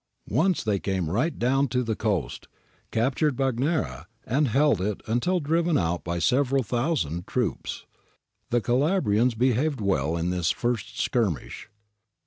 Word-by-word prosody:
Once 180 -3 +2
they 105 -3 0
came 95 -5 -2
right 125 - 0
down 135 +3 +2
to 125 +1 0
the 115 -2 -1
coast, 105 -5 -2 0.4
captured 130 +5 +1
Bagnara, 125 - -1 0.2
and 140 +4 +1
held 135 -3 +3
it 100 +1 -1
until 125 +12 +1
driven 165 +1 +1
out 85 0 -1
by 85 0 -2
several 135 - +2
thousand 120 - -1
troops. - - -2 0.6
The 120 0 +2
Cala 140 - +2
brians 115 - +2
behaved 130 +4 +1
well 85 -6 0
in 85 +2 -1
this 90 -2 0
first 120 -4 -2
skirmish. 105 - -1
120 Hz, 140 wpm, -26 LUFS, 95-140 Hz, 0.6 s, held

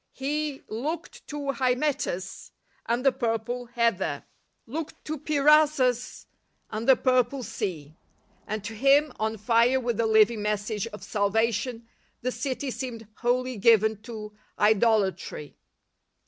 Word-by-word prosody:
He 290 +1 -3
— - - -40
" - - -42 0.2
Looked 330 +1 -6
to 290 -2 -3
Hymettus 250 -7 -1 0.4
and 240 +3 0
the 270 - +6
purple 240 0 -2
heather. 230 -11 0 0.4
Looked 305 +6 -6
to 310 -1 -4
Peirasus 290 -4 +3 0.5
and 220 +4 -2
the 265 - +9
purple 255 +1 +1
sea," 155 -8 -5 0.5
and 215 -1 -3
to 215 +2 -5
him 275 +6 +4
— - - -28
on 220 +1 -1
fire 235 +4 +3
with 240 -3 -2
the 230 - +2
living 220 0 +4
message 210 0 -2
of 210 -2 -10
salvation 225 +3 0 0.2
— - - -41
the 255 - 0
city 265 0 -3
seemed 235 -4 -6
" - - -43
wholly 250 0 0
given 220 -1 +4
to 215 -2 -8 0.2
idolatry." 210 -7 +1
235 Hz, 140 wpm, -26 LUFS, 215-265 Hz, 0.5 s, the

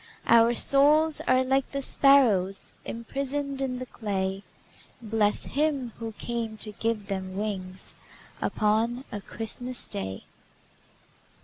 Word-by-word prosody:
Our 230 +1 +5
souls 300 +4 +4
are 255 0 +4
like 270 +1 +1
the 275 - -3
sparrows 225 -11 +3
Imprisoned 275 +4 -3
in 255 -2 -2
the 255 - -5
clay, 195 -5 -3 0.6
Bless 215 -2 0
Him 280 -4 -1
who 225 -1 -5
came 230 0 -4
to 215 - -2
give 220 0 -2
them 190 -1 -4
wings 190 -3 -4 0.5
Upon 225 +4 0
a 205 - -5
Christmas 240 +4 -2
Day! 95 -1 -3
230 Hz, 115 wpm, -27 LUFS, 205-265 Hz, 0.6 s, Our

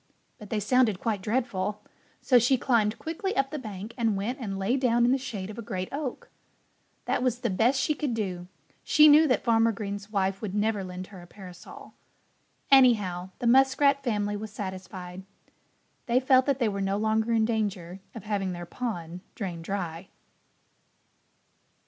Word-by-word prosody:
But 210 -2 -11
they 220 - -1
sounded 215 -2 +2
quite 215 -4 -2
dreadful. 210 -2 -2 0.4
So 250 -2 +5
she 250 +3 +3
climbed 225 -4 +1
quickly 380 +5 -4
up 270 0 +1
the 305 - -4
bank 215 -2 -8
and 225 -4 +1
went 235 +8 -3
and 200 -6 -4
lay 195 +6 0
down 240 -3 +2
in 245 - +3
the 265 - +3
shade 210 -6 -6
of 220 - -9
a - - -3
great 185 -5 -4
oak. 280 -3 -5 0.7
That - - 0
was 250 -1 0
the 235 - -1
best 235 +8 +2
she 305 - +1
could 285 -5 -2
do. 180 -5 -4 0.4
She 305 -1 +6
knew 305 +2 +7
that 255 - +1
Farmer 230 -1 +3
Green's 200 -1 -6
wife 195 -2 -1
would 205 -3 -4
never 210 -1 0
lend 185 0 -7
her 185 - -10
a 175 - -14
parasol. 180 -2 -12 0.8
Anyhow, 210 -9 +4
the - - -5
Muskrat 270 +3 +4
family 205 -4 -1
was 215 +1 -6
satisfied. 185 -2 -7 0.9
They 240 +1 +3
felt 260 0 +4
that 280 -2 +2
they 240 -4 +1
were 200 -1 -2
no 195 +1 0
longer 220 +2 0
in 225 -1 +3
danger 200 -5 -2 0.2
of 225 - -8
having 200 -3 -2
their 175 0 -7
pond 175 -5 -5
drained 175 -5 -5
dry. 180 -2 -4
215 Hz, 175 wpm, -27 LUFS, 195-250 Hz, 0.9 s, knew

